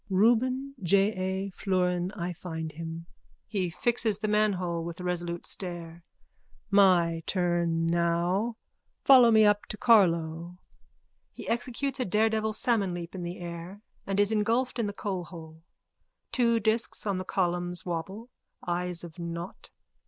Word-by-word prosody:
_ - - -51
Reuben 245 +7 +2
J. 195 +3 +3
A 190 +1 -3
florin 180 -1 0
I 180 -2 -4
find 160 -2 -6
him. 165 +1 -7 0.4
(He 190 -5 -2
fixes 225 +3 0
the 215 0 -3
manhole 185 -5 +1
with 170 0 -6
a - - -6
resolute 175 -1 -2
stare.) 170 -2 -5 0.7
My 175 -4 +4
turn 175 -3 +1
now 170 +1 +1
on. 235 0 -4 0.5
Follow 255 -3 +8
me 220 -1 +6
up 205 0 +2
to 215 - -6
Carlow. 170 -6 +3 0.8
_(He - - -7
executes 255 +3 -2
a 250 - 0
daredevil 220 +2 +1
salmon 205 -5 +1
leap 170 -1 -7
in 185 - -6
the 175 +1 -5
air 175 +4 -8 0.2
and 195 0 -1
is 205 +1 +4
engulfed 230 +4 +1
in 225 - +1
the 205 - -4
coalhole. 170 -5 -6 0.7
Two 235 -3 +3
discs 220 +2 0
on 195 -3 0
the - - -3
columns 175 -1 -1
wobble, 190 +8 -5 0.4
eyes 175 0 -2
of 170 0 -10
nought. 170 +2 -6
185 Hz, 145 wpm, -28 LUFS, 170-215 Hz, 0.8 s, Follow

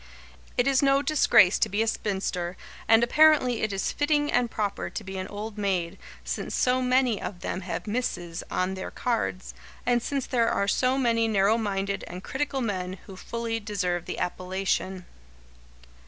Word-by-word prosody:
It 245 - +3
is 275 -1 +3
no 275 0 +3
disgrace 270 - +5
to - - +2
be 205 +3 +1
a - - -3
spinster, 190 -5 -2 0.3
and 225 +1 +6
apparently 255 -2 +4
it 215 - 0
is 195 -1 -1
fitting 295 0 +1
and 245 -1 +2
proper 205 -3 -2
to 220 - -6
be 190 -1 -6
an 185 - -4
old 210 +1 -6
maid, 185 -4 -1 0.2
since - - -3
so 255 0 +2
many 250 -3 +2
of 180 -3 -6
them 190 - -3
have 170 -2 -4
"Mrs." 190 -7 -3
on 185 +1 -1
their 190 0 -5
cards, 230 -6 -2 0.3
and 245 -1 +2
since 275 +1 -2
there 235 -3 +2
are 200 - 0
so 255 +5 +2
many 230 -3 +2
narrow 205 0 +3
minded 200 -2 -2
and 180 +2 -8
critical 275 0 -2
men 185 -5 -2
who 195 - -10
fully 230 +3 -3
deserve 180 -5 -2
the - - -5
appellation. 185 0 -2
215 Hz, 170 wpm, -27 LUFS, 190-250 Hz, 0.3 s, and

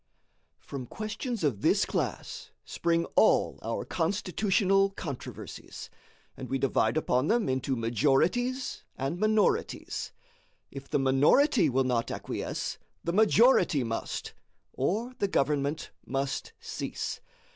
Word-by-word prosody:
From 130 -3 -7
questions 220 - -4
of 125 -10 0
this - - +3
class - - -3 0.2
spring 170 0 0
all - - +4
our - - -3
constitutional 195 +2 +1
controversies, 155 -9 -8 0.4
and 130 - -8
we 135 - 0
divide 135 +3 +1
upon 130 -3 +1
them 230 +2 +2
into 130 +1 0
majorities 150 - +1
and 140 +6 -2
minorities. 215 - 0 0.6
If 135 0 -9
the - - +1
minority 150 - +4
will 135 +1 +2
not 125 -2 0
acquiesce, - - -4 0.2
the 170 - -1
majority 215 - +5
must, 115 -1 -4 0.4
or 220 - -1
the 200 - +2
government 145 -2 0
must 135 +1 -3
cease. - - -5
160 Hz, 115 wpm, -29 LUFS, 135-210 Hz, 0.6 s, majority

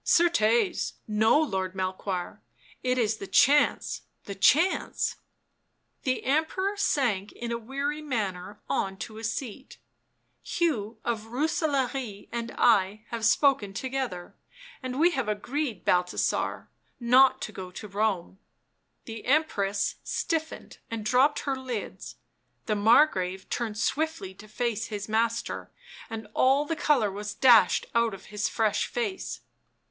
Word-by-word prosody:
" - - -48
Certes, 335 - +3
no, 215 +6 +4
Lord 190 -10 -1
Melchoir 185 -1 -3 0.2
— 115 - -27
it 255 - +1
is 220 -3 +1
the 195 - -7
chance! 290 +8 +3 0.2
the 200 - -6
chance 310 - +2 0.4
!" - - -47
The 255 -1 0
Emperor 320 +8 0
sank 240 - 0
in 235 0 -5
a 235 - -2
weary 280 +6 -3
manner 205 -8 -3
on 195 0 -1
to 220 +2 -7
a - - -10
seat. 250 +3 -5 0.4
" - - -46 0.2
Hugh 235 -11 0
of 225 -2 -2
Rooselaare 265 - -1
and 235 0 -4
I 210 -2 +3
have 230 -1 -4
spoken 225 -4 +3
together 255 -8 -4 0.5
and 255 0 -4
we 345 +3 +5
have 265 -8 -2
agreed, 240 - -3
Balthasar, 180 0 0 0.3
not 255 +2 +5
to - - -5
go 190 -3 -7
to 200 +4 -9
Rome." 195 -2 -1 0.7
The 225 -1 -7
Empress 210 -9 +1
stiffened 320 -2 -3
and 225 -2 -5
drooped 260 +6 +3
her 275 -2 -1
lids; 255 -5 -6 0.5
the 215 - 0
Mar 225 +8 +6
grave 190 -8 -4
turned 225 -3 -2
swiftly 310 -5 -1
to 210 +3 -14
face 225 0 -2
his 210 -1 -5
master, 230 +1 -1 0.4
and 225 -2 -6
all 270 +3 +3
the 330 - -2
colour 275 -10 +2
was 205 +2 -6
dashed 235 -9 +5
out 235 -3 +2
of 190 - -14
his 210 0 0
fresh 220 -2 +1
face. 435 -6 -4
230 Hz, 140 wpm, -27 LUFS, 205-275 Hz, 0.7 s, Mar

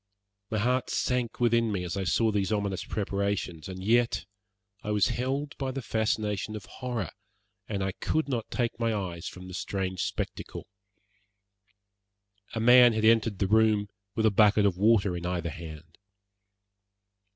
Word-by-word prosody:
My 110 - -1
heart 125 +4 +1
sank 125 -2 -1
within 115 -2 +3
me 95 -3 -2
as 90 +1 -4
I 95 -1 -2
saw 110 +5 +2
these 100 0 0
ominous 100 -3 -1
preparations, 100 -5 -2
and 95 0 -7
yet 115 -1 +2 0.6
I 105 - -6
was 105 -1 +3
held 135 +4 -2
by 135 -1 -1
the 135 0 -4
fascination 110 -2 -1
of 105 - -7
horror, 120 - -4 0.6
and 100 -3 -2
I 95 - -1
could 155 +11 -1
not 120 -5 -3
take 120 -1 -2
my 115 -1 +1
eyes 90 -4 -4
from 90 0 -9
the 95 - -9
strange 95 -1 -3
spectacle. - - -4 1.9
A - - -1
man 120 +1 +7
had 110 0 0
entered 115 -2 +4
the 100 - +1
room 105 0 +3 0.3
with 110 - +1
a 110 - +5
bucket 105 0 +5
of 100 -3 +2
water 100 -1 +3
in 85 - -5
either 85 -2 -2
hand. 80 0 -10
105 Hz, 160 wpm, -28 LUFS, 95-115 Hz, 1.9 s, man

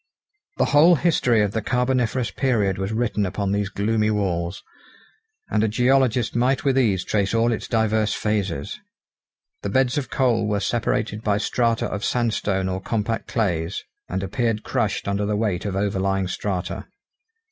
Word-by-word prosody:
The - - +3
whole 165 +4 +7
history 125 -9 +2
of 100 - 0
the 110 - -2
carboniferous 125 -1 0
period 105 -8 0
was 95 +2 -2
written 110 -2 0
upon 100 +1 -2
these 100 -1 0
gloomy 105 +2 0
walls, 95 -4 -1 0.9
and 105 - +2
a - - +3
geologist 125 +1 +2
might 125 +3 +2
with 135 -2 +3
ease 105 -8 +2
trace 100 +1 0
all 115 +1 +3
its 110 - -3
diverse 110 -2 +1
phases. 105 - -2 0.8
The - - -3
beds 130 +1 +2
of 135 - -6
coal 120 -6 +1
were 105 -1 0
separated 110 -1 -1
by 105 -2 +1
strata 115 +1 0
of 100 - -4
sandstone 105 -5 0
or 95 0 -3
compact 115 +2 -2
clays, 90 -6 -1 0.3
and 95 +1 -2
appeared 110 +3 -1
crushed - - -1
under 100 +1 0
the 105 0 0
weight 105 -4 -1
of 100 -2 -2
overlying 95 -1 0
strata. 95 -1 -3
105 Hz, 160 wpm, -23 LUFS, 100-120 Hz, 0.9 s, whole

